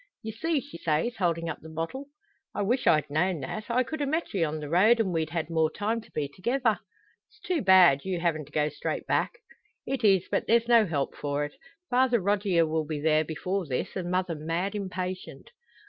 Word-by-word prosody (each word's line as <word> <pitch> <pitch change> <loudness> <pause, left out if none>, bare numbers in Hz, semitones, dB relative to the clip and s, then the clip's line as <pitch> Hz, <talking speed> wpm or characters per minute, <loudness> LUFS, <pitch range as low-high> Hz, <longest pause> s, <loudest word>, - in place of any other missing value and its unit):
"You 220 - -4
see," 315 +6 -1
she 285 -11 -11
says, 165 +10 0
holding 170 -3 0
up 160 - -4
the 160 - -11
bottle. 165 - -5 0.5
"I 205 - 0
weesh 245 +6 0
I'd 150 -2 +4
known 170 +1 +1
that. 215 0 -5
I 250 +2 +2
could 310 +4 -5
a 285 - 0
met 320 +4 -2
ye 190 -4 +1
on 155 0 -2
the 150 - -6
road, 205 +9 +4
and 195 -5 +1
we'd 160 -2 -1
had 165 -1 -3
more 160 -1 +2
time 215 +6 -2
to - - -19
be 150 - -2
thegither. 225 - 0 0.5
It's - - -25
too 355 -5 -1
bad, 185 -8 +6
you 185 -2 -2
havin' 165 -3 0
to 150 - -19
go 150 0 +1
straight 150 - -4
back." - - 0 0.5
"It 270 -2 -3
is. 195 -4 +4
But - - 0
there's 230 +1 +3
no 230 -3 +5
help 145 -5 -1
for 145 0 -2
it. 145 - -9 0.4
Father 250 -1 +3
Rogier 195 -3 +2
will 160 0 -1
be 155 -1 -3
there 155 +1 +3
before 180 +4 -3
this, 130 -2 -3
and 180 -2 -3
mother 180 -1 0
mad 165 +6 -2
impatient." 185 - -5
185 Hz, 215 wpm, -27 LUFS, 160-225 Hz, 0.5 s, bad